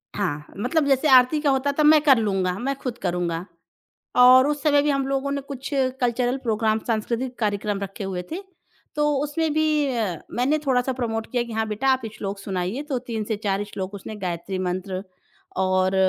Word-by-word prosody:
हाँ, 150 Hz, +1 st, -2 dB
मतलब 270 Hz, +9 st, +1 dB
जैसे 270 Hz, +2 st, +3 dB
आरती 255 Hz, +3 st, +6 dB
का 295 Hz, -, +2 dB
होता 270 Hz, +1 st, +2 dB
तो 305 Hz, -, +3 dB
मैं 305 Hz, 0 st, +7 dB
कर 275 Hz, -4 st, +6 dB
लूँगा 190 Hz, -4 st, 0 dB
मैं 275 Hz, +3 st, -1 dB
खुद 245 Hz, -2 st, -4 dB
करूँगा 175 Hz, -1 st, -2 dB, 0.7 s
और 255 Hz, +2 st, +8 dB
उस 295 Hz, -1 st, -1 dB
समय 290 Hz, -2 st, +4 dB
भी 295 Hz, -, 0 dB
हम 275 Hz, -1 st, +1 dB
लोगों 275 Hz, 0 st, -1 dB
ने 280 Hz, 0 st, -2 dB
कुछ 275 Hz, -1 st, -7 dB, 0.3 s
कल्चरल 245 Hz, +1 st, +1 dB
प्रोग्राम 220 Hz, -1 st, +1 dB
सांस्कृतिक 235 Hz, +3 st, -2 dB
कार्यक्रम 205 Hz, -2 st, -1 dB
रखे 200 Hz, +2 st, -5 dB
हुए 190 Hz, -2 st, -3 dB
थे 350 Hz, +4 st, -4 dB, 0.5 s
तो 295 Hz, 0 st, +2 dB
उसमें 305 Hz, +2 st, -1 dB
भी 305 Hz, -2 st, +2 dB
अ, 200 Hz, -8 st, -1 dB
मैंने 260 Hz, +5 st, +1 dB
थोड़ा-सा 260 Hz, -1 st, +1 dB
प्रमोट 225 Hz, -3 st, -3 dB
किया 245 Hz, -1 st, +1 dB
कि 235 Hz, -, -9 dB
हाँ, 220 Hz, 0 st, -1 dB
बेटा 215 Hz, +5 st, -2 dB
आप 260 Hz, -3 st, +2 dB
श्लोक 195 Hz, 0 st, -5 dB
सुनाइए 195 Hz, +6 st, -3 dB
तो 260 Hz, -3 st, 0 dB
3 230 Hz, -3 st, -4 dB
से 220 Hz, +1 st, -2 dB
4 200 Hz, 0 st, 0 dB
श्लोक 195 Hz, -1 st, -6 dB
उसने 205 Hz, +2 st, -7 dB
गायत्री 180 Hz, +2 st, -3 dB
मंत्र 185 Hz, +1 st, -3 dB, 0.6 s
और 185 Hz, 0 st, +2 dB
240 Hz, 190 wpm, -24 LUFS, 195-275 Hz, 0.7 s, और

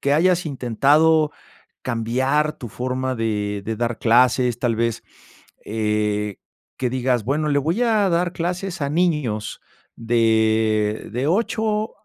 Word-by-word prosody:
que 140 Hz, -, +1 dB
hayas 175 Hz, +2 st, +2 dB
intentado 150 Hz, +4 st, +2 dB, 0.5 s
cambiar 130 Hz, +6 st, 0 dB
tu 120 Hz, -, -7 dB
forma 130 Hz, +3 st, -3 dB
de 105 Hz, -3 st, -2 dB
de 110 Hz, +2 st, -2 dB
dar 120 Hz, 0 st, -2 dB
clases, 125 Hz, 0 st, +3 dB
tal 120 Hz, -3 st, 0 dB
vez, 115 Hz, 0 st, -1 dB, 0.6 s
eh, 105 Hz, -1 st, -1 dB, 0.4 s
que 125 Hz, -2 st, -1 dB
digas, 125 Hz, -3 st, 0 dB
bueno, 150 Hz, +4 st, 0 dB
le 145 Hz, -, +2 dB
voy 165 Hz, -, 0 dB
a 220 Hz, -4 st, +2 dB
dar 175 Hz, +1 st, +1 dB
clases 180 Hz, +1 st, -3 dB
a 140 Hz, -, 0 dB
niños 150 Hz, -10 st, -1 dB, 0.4 s
de 110 Hz, -2 st, +1 dB
de 125 Hz, +4 st, -1 dB
8 215 Hz, +2 st, 0 dB
125 Hz, 130 wpm, -21 LUFS, 110-155 Hz, 0.6 s, clases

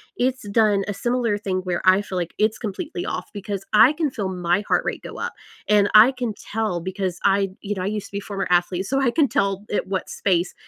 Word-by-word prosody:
it's 255 Hz, -3 st, -1 dB
done 205 Hz, -2 st, +3 dB
a 205 Hz, -, -2 dB
similar 240 Hz, 0 st, 0 dB
thing 195 Hz, -2 st, -2 dB
where 180 Hz, -2 st, -2 dB
I 185 Hz, +1 st, +6 dB
feel 190 Hz, -2 st, -5 dB
like 175 Hz, -1 st, -3 dB
it's 215 Hz, +1 st, +1 dB
completely 315 Hz, -, -5 dB
off -, -, -4 dB
because 200 Hz, -1 st, -5 dB
I 220 Hz, +5 st, +7 dB
can 310 Hz, -1 st, 0 dB
feel 205 Hz, -7 st, -3 dB
my 180 Hz, 0 st, 0 dB
heart -, -, +2 dB
rate -, -, -3 dB
go -, -, -8 dB
up. -, -, -3 dB, 0.3 s
And 205 Hz, -1 st, +4 dB
I 220 Hz, +5 st, +9 dB
can 245 Hz, -4 st, -3 dB, 0.2 s
tell 215 Hz, -5 st, 0 dB
because 185 Hz, 0 st, -3 dB
I 195 Hz, 0 st, +3 dB
you 205 Hz, -, -3 dB
know, 185 Hz, -, -4 dB
I 185 Hz, -, -2 dB
used 210 Hz, 0 st, -3 dB
to -, -, -22 dB
be 200 Hz, -, -2 dB
former 200 Hz, -1 st, -4 dB
athlete, 180 Hz, +1 st, +1 dB
so 270 Hz, +6 st, 0 dB
I 255 Hz, -3 st, +2 dB
can 300 Hz, +2 st, +3 dB
tell 195 Hz, -3 st, -1 dB
it 205 Hz, -, -1 dB
what 190 Hz, -1 st, -3 dB
space, 180 Hz, -2 st, 0 dB
200 Hz, 235 wpm, -23 LUFS, 190-225 Hz, 0.3 s, I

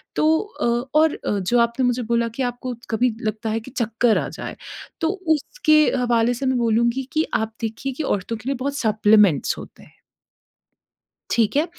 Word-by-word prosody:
तो 315 Hz, +1 st, +3 dB
अ, 425 Hz, +2 st, -5 dB, 0.3 s
और 315 Hz, -1 st, +4 dB
अ, 205 Hz, -, -2 dB
जो 215 Hz, +6 st, +1 dB
आपने 235 Hz, +2 st, +1 dB
मुझे 245 Hz, 0 st, +1 dB
बोला 235 Hz, +1 st, +1 dB
कि 265 Hz, -, -1 dB
आपको 245 Hz, +1 st, -3 dB, 0.2 s
कभी 235 Hz, +1 st, +1 dB
लगता 220 Hz, 0 st, -3 dB
है 220 Hz, +1 st, 0 dB
कि 230 Hz, +4 st, -12 dB
चक्कर 230 Hz, -2 st, +1 dB
आ -, -, -1 dB
जाए, -, -, -7 dB, 0.5 s
तो 325 Hz, -, +2 dB, 0.3 s
उसके 310 Hz, -, +2 dB, 0.2 s
हवाले 240 Hz, -1 st, +2 dB
से 255 Hz, +3 st, -4 dB
मैं 260 Hz, -1 st, +1 dB
बोलूँगी 235 Hz, +2 st, +1 dB
कि 315 Hz, +1 st, +2 dB
आप 220 Hz, 0 st, -1 dB
देखिए 230 Hz, +4 st, -3 dB
कि 305 Hz, -, -4 dB
औरतों 215 Hz, -2 st, -2 dB
के 220 Hz, +3 st, -12 dB
लिए 275 Hz, -, 0 dB
बहुत 280 Hz, +1 st, -2 dB
सप्लीमेंट्स 210 Hz, -, +3 dB
होते -, -, -12 dB
हैं। -, -, -20 dB, 1.4 s
ठीक 230 Hz, +2 st, +1 dB
है? 310 Hz, +4 st, +2 dB
235 Hz, 185 wpm, -22 LUFS, 220-270 Hz, 1.4 s, और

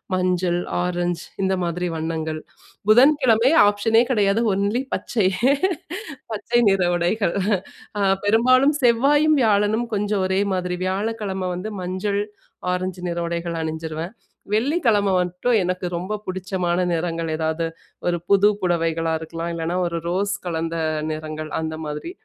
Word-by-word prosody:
மஞ்சள், 180 Hz, -1 st, +1 dB, 0.2 s
ஆரஞ்ச் 175 Hz, -1 st, -1 dB, 0.2 s
இந்த 190 Hz, 0 st, +2 dB
மாதிரி 175 Hz, +1 st, -2 dB
வண்ணங்கள். 160 Hz, -1 st, -3 dB, 0.5 s
புதன்கிழமை 255 Hz, 0 st, +5 dB, 0.2 s
ஆப்ஷனே 225 Hz, +3 st, +3 dB
கிடையாது. 205 Hz, -2 st, +2 dB
ஒன்லி 200 Hz, +6 st, 0 dB
பச்சை. 215 Hz, -6 st, 0 dB, 1.0 s
பச்சை 235 Hz, +2 st, 0 dB
நிற 195 Hz, -1 st, +2 dB
உடைகள். 175 Hz, +2 st, 0 dB, 0.6 s
அ -, -, 0 dB, 0.2 s
பெரும்பாலும் 255 Hz, +7 st, +4 dB
செவ்வாயும், 285 Hz, +6 st, +4 dB
வியாழனும் 215 Hz, +2 st, +2 dB
கொஞ்சம் 205 Hz, -1 st, 0 dB
ஒரே 190 Hz, +1 st, +1 dB
மாதிரி. 180 Hz, -1 st, -2 dB
வியாழக்கிழமை 195 Hz, -1 st, -2 dB
வந்து 185 Hz, +5 st, -4 dB
மஞ்சள், 190 Hz, +3 st, -1 dB, 0.5 s
ஆரஞ்சு 185 Hz, 0 st, -3 dB
நிற 170 Hz, 0 st, -2 dB
உடைகள் 170 Hz, -1 st, -3 dB
அணிஞ்சிருவேன். 160 Hz, +3 st, -4 dB, 0.4 s
வெள்ளிக்கிழமை 220 Hz, -, +2 dB
மட்டும் 180 Hz, +7 st, 0 dB
எனக்கு 180 Hz, +1 st, -2 dB
ரொம்ப 185 Hz, +5 st, -3 dB
பிடிச்சமான 185 Hz, -1 st, -1 dB
நிறங்கள் 165 Hz, -1 st, -2 dB
ஏதாவது 160 Hz, +1 st, -1 dB, 0.4 s
ஒரு 175 Hz, -1 st, +1 dB
புது 200 Hz, 0 st, +6 dB
புடவைகளா 165 Hz, -2 st, 0 dB
இருக்கலாம்! 165 Hz, +1 st, -5 dB
இல்லன்னா, 165 Hz, +1 st, -2 dB
ஒரு 170 Hz, 0 st, -3 dB
ரோஸ் 200 Hz, +3 st, 0 dB
கலந்த 165 Hz, -1 st, -2 dB, 0.4 s
நிறங்கள் 155 Hz, 0 st, -5 dB
அந்த 160 Hz, 0 st, -3 dB
மாதிரி. 150 Hz, -, -5 dB
185 Hz, 120 wpm, -22 LUFS, 170-210 Hz, 1.0 s, புது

